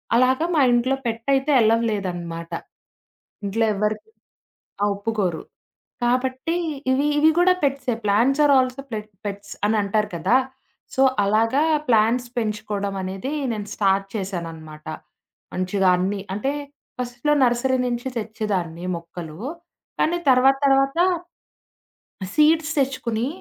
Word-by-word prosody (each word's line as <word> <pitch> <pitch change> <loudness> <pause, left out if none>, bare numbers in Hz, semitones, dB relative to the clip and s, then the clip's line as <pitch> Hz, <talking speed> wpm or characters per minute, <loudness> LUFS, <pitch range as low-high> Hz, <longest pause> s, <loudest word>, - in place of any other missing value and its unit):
అలాగా 260 +6 +3
మా - - +4
ఇంట్లో 255 +3 +2
పెట్ 225 0 -3
అయితే 270 +2 +1
అలౌ 225 +1 +4
లేదనమాట. 175 -4 -4 0.9
ఇంట్లో 225 +3 +1
ఎవ్వరికి 210 - -2 0.7
ఆ! - - +4
ఒప్పుకోరు. 200 -5 -2 0.6
కాబట్టి 260 +6 0 0.4
ఇవి 275 +3 +2
ఇవి 315 +1 +6
గూడా 365 +1 +5
పెట్సే. 275 -3 0
ప్లాంట్స్ 250 +8 +3
ఆర్ 285 - +5
ఆల్సో 255 +1 -1
పె - - -1 0.3
పెట్స్ 200 0 -6
అని 220 0 +2
అంటారు 210 +1 0
కదా! 235 +10 +3 0.6
సో 265 - +2 0.2
అలాగా 225 +7 +2 0.3
ప్లాంట్స్ 230 +2 +3
పెంచుకోవడం 210 -3 -2
అనేది 190 +9 -4 0.2
నేను 205 -1 -5
స్టార్ట్ 195 -1 +2
చేశాననమాట 165 -6 -6 0.7
మంచిగా 185 +1 0
అన్నీ. 195 +2 -1
అంటే, 240 +8 -1 0.5
ఫస్ట్‌లో 245 +4 -1
నర్సరీ 255 +2 +2
నుంచి 240 +1 -3
తెచ్చేదాన్ని 200 -6 -3
మొక్కలు. 170 -2 -8 0.6
కానీ 345 +2 +2
తర్వాత 260 +1 +5
తర్వాత, 275 +2 +3 1.3
ఆ - - -4
సీడ్స్ 310 +1 +4
తెచ్చుకొని 250 -4 0
225 Hz, 120 wpm, -23 LUFS, 195-265 Hz, 1.3 s, ఇవి